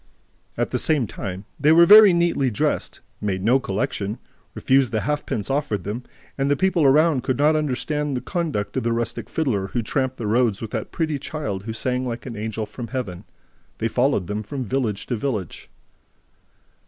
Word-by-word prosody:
At - - -1
the - - 0
same 150 -6 +1
time, 95 -1 -6
they 150 - +4
were 170 +1 +7
very 210 +1 +9
neatly 170 -6 +2
dressed, 105 - -2 0.2
made 95 -3 -2
no 125 +5 +4
collection, 100 -1 -2 0.4
refused 135 -1 +2
the 110 - 0
halfpence 145 -6 -2
offered 135 -9 -1
them; 105 +6 -4 0.4
and 135 +1 +1
the 145 - +3
people 185 -5 +2
around 150 0 +4
could 130 0 -1
not 150 +2 +4
understand 150 -1 -1
the - - -4
conduct 150 - -3
of - - +1
this 115 - 0
rustic 115 0 -3
fiddler, 115 -12 -1
who 120 +3 -2
tramped 130 +3 -1
the 115 - -4
roads 110 -1 +2
with 110 -2 -6
that 110 -3 -4
pretty 155 -4 -1
child 105 -11 -4
who 110 - -4
sang 125 +3 -1
like 120 -2 -5
an 120 -3 -6
angel 110 +1 -3
from 120 +2 -8
Heaven. 110 -8 -5 0.5
They 115 - 0
followed 125 -4 +1
them 105 +4 -3
from 130 +4 -5
village 110 -4 -2
to 125 - -2
village. 110 - -4
125 Hz, 185 wpm, -23 LUFS, 105-145 Hz, 0.5 s, very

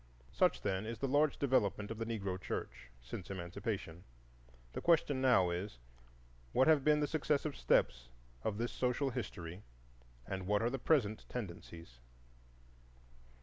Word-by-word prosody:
Such, - - +2
then, 100 +1 -1
is 115 0 -4
the 135 - -1
large 145 +2 +3
development 110 -6 +1
of 115 - -5
the 115 - -2
Negro 100 -5 -3
church - - -5
since 75 +9 -7
Emancipation. 90 -1 -4 0.7
The - - -4
question 155 -5 +3
now 120 -9 +5
is, 90 - -4 0.8
What 130 - +4
have 155 -4 +5
been 150 0 +4
the - - +3
successive 150 -1 0
steps 65 -1 +2 0.3
of 105 - -1
this 120 +2 -1
social 130 +2 0
history 85 -4 -5 0.6
and 95 +3 -4
what 105 +1 +2
are 120 - +1
the 135 - -2
present 115 -8 +1
tendencies? 85 - -7
110 Hz, 145 wpm, -35 LUFS, 95-135 Hz, 0.8 s, now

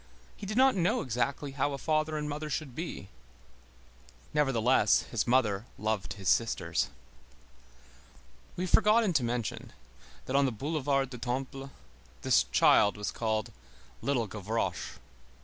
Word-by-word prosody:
He 200 - -8
did 215 +3 -3
not 265 0 +6
know 180 -2 +1
exactly 130 +3 -2
how 140 +1 -1
a - - -3
father 155 +2 0
and 150 0 -3
mother 150 +1 -4
should 140 -2 -3
be. 155 - -6 1.2
Nevertheless, 130 -6 +3
his 115 -1 -1
mother 115 -4 +2
loved 105 -2 -2
his 95 -2 -7
sisters. 115 +5 +1 1.7
We 180 - -3
have 185 - -3
forgotten 215 -2 +4
to 140 - +2
mention, 120 -1 -3 0.5
that 130 - -3
on 140 0 +4
the - - -1
Boulevard 135 +1 -1
du 125 - -7
Temple 135 +2 -4 0.5
this 65 - +4
child 65 +11 +4
was 105 - -3
called 110 -2 -2 0.5
Little 130 -5 0
Gavroche. 105 +2 -3
130 Hz, 135 wpm, -30 LUFS, 110-150 Hz, 1.7 s, not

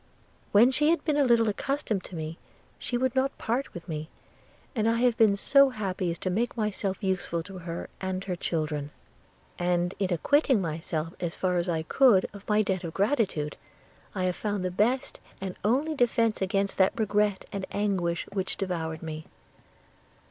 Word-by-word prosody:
When 230 +5 +6
she 295 +3 +2
had 340 - +1
been 305 -3 +2
a 290 - +4
little 235 -3 +4
accustomed 215 -2 -1
to 180 - -9
me, 160 0 -5 0.4
she 245 - -2
would 260 0 +1
not 265 +1 +1
part 245 +5 -1
with 175 -1 -9
me; 155 -1 -4 0.7
I 225 - +1
have 240 0 +3
been 215 -3 +4
so 275 +6 +5
happy 195 -6 -2
as 170 - -3
to 185 - -1
make 235 +6 -1
myself 205 -2 -2
useful 180 -3 -1
to 190 +1 -9
her 170 -1 -5
and 190 0 -2
her 185 -2 -3
children; 155 -4 -2 0.7
and 175 0 +1
in 195 -2 0
acquitting 265 - +3
myself 165 -1 -3
as 170 -2 -3
far 180 -1 0
as 175 +1 0
I 160 -2 0
could 210 +1 +5
of 200 +1 -11
my 210 0 +4
debt 190 -2 -1
of 165 -2 -6
gratitude, 195 - 0 0.6
I 185 - -1
have 180 -1 +1
found 205 -3 -2
the 180 - -1
best 230 +8 0 0.2
and 190 -1 -4
only 270 +9 +2
defence 230 -5 +2
against 195 +1 0
that 190 +4 +3
regret 210 -2 +1
and 195 -1 -4
anguish 185 -5 -1
which 190 -2 -2
devoured 165 -5 -3
me. 155 -1 -6
195 Hz, 175 wpm, -28 LUFS, 175-230 Hz, 0.7 s, When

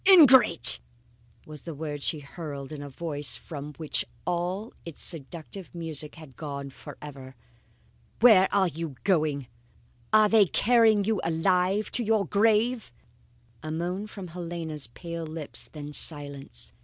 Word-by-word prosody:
"Ingrate!" 265 - +9 0.7
was 150 -2 -7
the 165 +1 -8
word 145 -1 -6
she 150 +1 -2
hurled 140 -2 -8
in 150 -2 -7
a 145 - -8
voice 145 0 -2
from 150 -2 -9
which 155 -2 -1 0.2
all 180 +5 -3
its 170 -3 -9
seductive 170 +4 -4
music 160 -3 -3
had 155 -6 -14
gone 140 -3 -7
forever. 135 -2 -11 0.8
"Where 210 -5 +6
are 195 -2 +2
you 165 -3 -6
going? 155 -7 0 0.7
Are 215 0 +5
they 210 -2 +4
carrying 220 0 +3
you 215 0 -1
alive 180 +5 0
to 245 - +1
your 215 -2 +1
grave?" 220 - +1 0.7
A 155 - -7
moan 180 +6 -4
from 195 -4 -9
Helena's 165 -5 -5
pale 165 +6 -7
lips, 155 -2 -7
then 150 -1 -8
silence. 140 - -1
165 Hz, 135 wpm, -26 LUFS, 145-200 Hz, 0.8 s, Ingrate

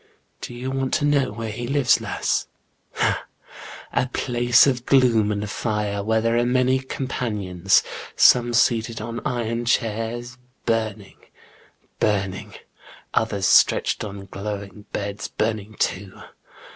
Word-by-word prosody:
Do 120 - -7
you 130 +2 -4
want 135 -1 -1
to - - +1
JEAN 145 - +2
GRENIEB. 145 -1 +4
89 125 - -6
know - - -11
where 115 -1 -4
he 120 +3 -5
lives, 140 -1 +3
lass? - - -1 0.5
Ha, - - 0 0.7
in - - +3
a - - -3
place 120 -1 +3
of 125 -3 -1
gloom 120 -6 +4
and 105 0 -2
fire, 105 -1 -2
where 110 +1 +1
there 115 +1 +1
are - - +2
many 130 +1 +2
companions, 105 -9 0 0.3
some 120 -1 +5
seated 115 -1 +2
on 115 +2 -5
iron 120 -1 -2
chairs, 120 +2 -1 0.3
burning, 110 -3 -2 0.8
burning; 100 -1 -1 0.6
others 100 -3 0
stretched - - +4
on 100 -2 -7
glowing 100 +1 -7
beds, 100 0 -4
burning 110 -1 -3
too. 95 0 -2
115 Hz, 140 wpm, -23 LUFS, 105-120 Hz, 0.8 s, some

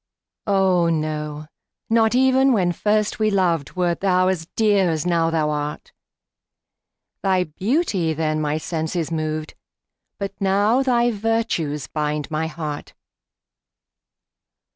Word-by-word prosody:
Oh, 190 -4 +3
no 155 -1 -3 0.4
not 225 0 +3
even 265 +1 +4
when 180 -5 +2
first 210 +4 0
we 215 0 +3
loved, 175 -7 0
Wert 175 -2 0
thou 185 -1 +2
as 165 -4 -2
dear 205 -4 +3
as 160 -1 -1
now 170 -2 +2
thou 155 -2 0
art; 150 0 -4 1.3
Thy 190 -2 +2
beauty 190 - 0
then 155 0 -1
my 150 0 0
senses 160 +1 -3
moved, 155 -1 -3 0.6
But 195 -1 -4
now 205 +6 +3
thy 240 -2 +2
virtues 210 - -1
bind 150 -1 -3
my 160 +1 -1
heart. 150 -2 -6
175 Hz, 120 wpm, -22 LUFS, 155-210 Hz, 1.3 s, even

